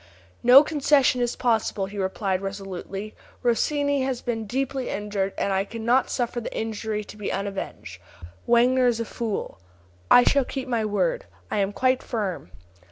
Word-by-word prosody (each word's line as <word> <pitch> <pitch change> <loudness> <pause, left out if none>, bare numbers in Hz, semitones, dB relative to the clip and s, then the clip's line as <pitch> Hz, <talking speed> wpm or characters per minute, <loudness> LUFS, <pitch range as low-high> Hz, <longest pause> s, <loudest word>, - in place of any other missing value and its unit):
"No 255 +4 +8
concession 285 -4 +2
is 240 -1 0
possible," 225 -4 0
he 200 +1 -7
replied, 190 0 -1
resolutely. 195 +1 -6 0.3
"Rossini 285 +4 +1
has 260 -2 -1
been 225 -3 -3
deeply 265 +2 -2
injured, 200 -1 -2
and 200 - 0
I 190 0 +1
cannot 230 +4 0
suffer 240 -1 -2
the - - -6
injury 220 -1 -3
to 205 - -12
be 210 -2 -4
unavenged. 150 - -5 0.5
Wagner 250 +2 +4
is 235 -2 +1
a 230 - -2
fool. 220 - -4 0.5
I 245 - +8
shall 280 +1 +3
keep 265 +1 -5
my 230 -3 0
word. - - 0 0.3
I - - 0
am 195 0 +1
quite 255 +4 +1
firm." 205 - -4
225 Hz, 160 wpm, -25 LUFS, 200-255 Hz, 0.5 s, No